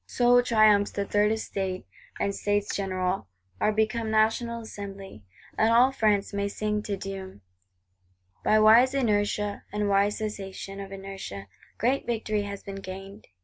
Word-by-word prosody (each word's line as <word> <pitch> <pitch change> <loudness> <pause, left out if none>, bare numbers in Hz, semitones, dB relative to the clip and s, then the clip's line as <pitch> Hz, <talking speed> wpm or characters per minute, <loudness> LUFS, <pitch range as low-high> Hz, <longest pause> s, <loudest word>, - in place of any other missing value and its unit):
So 245 0 +4
triumphs 215 -4 +4
the 200 - -3
Third 205 +1 +2
Estate; 195 -4 -3 0.3
and 200 - 0
States 205 0 -1
General 185 - -2 0.3
are 215 - +2
become 220 +1 0
National 225 +2 +1
Assembly; 195 - -9 0.3
and 220 +1 +3
all 245 +3 +5
France 210 -6 +1
may 200 0 -1
sing 210 +1 -2
Te 210 -1 -3
Deum. 190 - -7 1.0
By 215 - +4
wise 230 +5 +6
inertia, 210 -4 0
and 210 0 -1
wise 200 +1 +2
cessation 195 -2 -6
of 195 0 -7
inertia, 195 - -7 0.3
great 255 +4 0
victory 220 -3 -1
has 200 -1 -6
been 195 0 -7
gained. 195 +2 -9
205 Hz, 145 wpm, -27 LUFS, 195-220 Hz, 1.0 s, wise